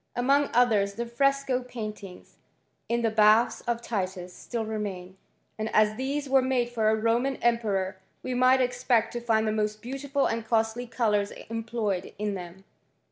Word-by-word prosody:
Among 275 Hz, +4 st, +2 dB
others 215 Hz, -5 st, +3 dB
the 235 Hz, -, -3 dB
fresco 270 Hz, +1 st, +1 dB
pain 230 Hz, -4 st, -6 dB, 1.0 s
in 235 Hz, 0 st, 0 dB
the 225 Hz, -, +2 dB
baths 215 Hz, +2 st, +4 dB
of 235 Hz, 0 st, -1 dB
Titus, 185 Hz, -5 st, -3 dB
still 230 Hz, +3 st, -5 dB
remain; 195 Hz, -4 st, -5 dB, 0.4 s
and 215 Hz, 0 st, -2 dB
as 215 Hz, 0 st, +5 dB
liiese 270 Hz, +3 st, 0 dB
made 255 Hz, -2 st, +1 dB
for 220 Hz, -2 st, +1 dB
a 220 Hz, -, +3 dB
Roman 235 Hz, +5 st, +1 dB
emperor, 205 Hz, -6 st, 0 dB, 0.3 s
we 255 Hz, -, -3 dB
might 255 Hz, +1 st, +4 dB
expect 245 Hz, -2 st, +1 dB
to 240 Hz, -, -2 dB
the 220 Hz, -2 st, +1 dB
most 215 Hz, 0 st, -1 dB
beautiful 275 Hz, +4 st, -2 dB
and 230 Hz, 0 st, -1 dB
costly 225 Hz, +2 st, 0 dB
colours 210 Hz, -4 st, +1 dB, 0.2 s
employed 225 Hz, -4 st, -3 dB
them. 190 Hz, -3 st, -5 dB
230 Hz, 145 wpm, -27 LUFS, 215-250 Hz, 1.0 s, as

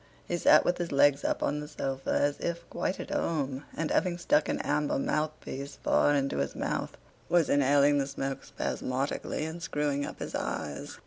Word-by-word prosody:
He 175 Hz, -, -1 dB
sat -, -, +6 dB
with 175 Hz, -, +1 dB
his 175 Hz, -1 st, -2 dB
legs 140 Hz, 0 st, +4 dB
up -, -, 0 dB
on 150 Hz, -, 0 dB
the 150 Hz, -, -6 dB
sofa 135 Hz, -2 st, -4 dB
as 145 Hz, 0 st, +1 dB
if 170 Hz, 0 st, -3 dB
quite 185 Hz, -, -2 dB
at -, -, -6 dB
home 140 Hz, -3 st, -1 dB
and, 160 Hz, -1 st, -1 dB
having 180 Hz, -2 st, +1 dB
stuck 295 Hz, -, +2 dB
an -, -, 0 dB
amber 150 Hz, 0 st, 0 dB
mouthpiece 145 Hz, -1 st, -3 dB
far 145 Hz, -, +3 dB
into 140 Hz, -, 0 dB
his 70 Hz, 0 st, -2 dB
mouth, -, -, -3 dB, 0.3 s
was 175 Hz, -3 st, +3 dB
inhaling 145 Hz, +1 st, +4 dB
the 135 Hz, -, 0 dB
smoke 135 Hz, -1 st, -4 dB
spasmodically 135 Hz, +3 st, -2 dB
and 160 Hz, +2 st, -6 dB
screwing 145 Hz, -3 st, -1 dB
up -, -, -6 dB
his -, -, -6 dB
eyes. 70 Hz, -1 st, -4 dB
145 Hz, 185 wpm, -29 LUFS, 140-155 Hz, 0.3 s, sat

